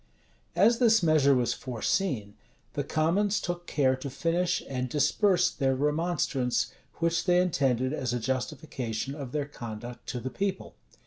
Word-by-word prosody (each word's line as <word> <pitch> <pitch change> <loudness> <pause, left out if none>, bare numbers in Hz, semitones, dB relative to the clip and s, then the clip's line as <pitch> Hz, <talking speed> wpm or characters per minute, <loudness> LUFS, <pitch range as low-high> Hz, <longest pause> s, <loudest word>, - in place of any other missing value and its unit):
As 230 +3 +4
this 225 -5 +5
measure 150 -4 +5
was 125 -2 +1
foreseen, 120 - -2 0.4
the - - -1
commons 195 +6 +1
took 175 0 -4
care 130 -3 +2
to 140 +2 -6
finish 165 +6 0
and 125 -1 -3
disperse 180 - +3
their 135 -2 0
remonstrance, 150 -3 0 0.2
which 170 0 0
they 180 -1 +4
intended 135 -7 +1
as 130 -5 -2
a 125 - -1
justification 130 -1 -3
of 140 -4 -7
their 145 0 -1
conduct 120 -3 -8
to 125 - -3
the 130 +2 -5
people. 195 +6 -3
140 Hz, 145 wpm, -28 LUFS, 125-175 Hz, 0.4 s, this